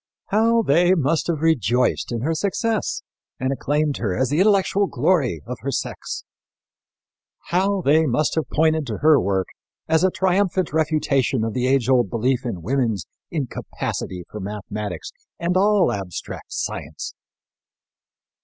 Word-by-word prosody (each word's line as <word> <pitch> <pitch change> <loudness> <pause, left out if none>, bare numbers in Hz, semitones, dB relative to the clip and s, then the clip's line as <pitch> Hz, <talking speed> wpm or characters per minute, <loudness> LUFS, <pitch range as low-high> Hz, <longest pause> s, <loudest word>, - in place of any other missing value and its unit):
How 230 +2 +3
they 175 +3 +4
must 155 0 +1
have 165 -4 -1
rejoiced 125 -7 +2
in 115 -2 -2
her 160 +6 0
success 205 +6 -1 0.4
and 130 +1 0
acclaimed 145 +1 0
her 100 -6 -2
as 130 0 +1
the 150 - +2
intellectual 200 0 +3
glory 130 - +1
of - - -5
her - - -3
sex! - - -4 1.3
How 190 +2 +1
they 155 +2 +4
must 145 +4 +1
have 155 -4 -1
pointed 160 -1 +2
to 110 -3 -3
her 155 -2 +6
work 95 -1 0 0.4
as 160 +1 +3
a 185 - +5
triumphant 185 -1 +1
refutation 145 -6 +1
of 110 -1 -2
the 125 0 0
age 130 -2 +2
old 125 -2 +3
belief 125 +2 0
in 95 -8 -5
woman's 115 - 0 0.2
incapacity 125 - -4
for 105 - -8
mathematics 105 -2 -5 0.3
and 175 +1 0
all 200 -1 +4
abstract 95 -4 -6
science! - - -4
150 Hz, 145 wpm, -22 LUFS, 120-175 Hz, 1.3 s, her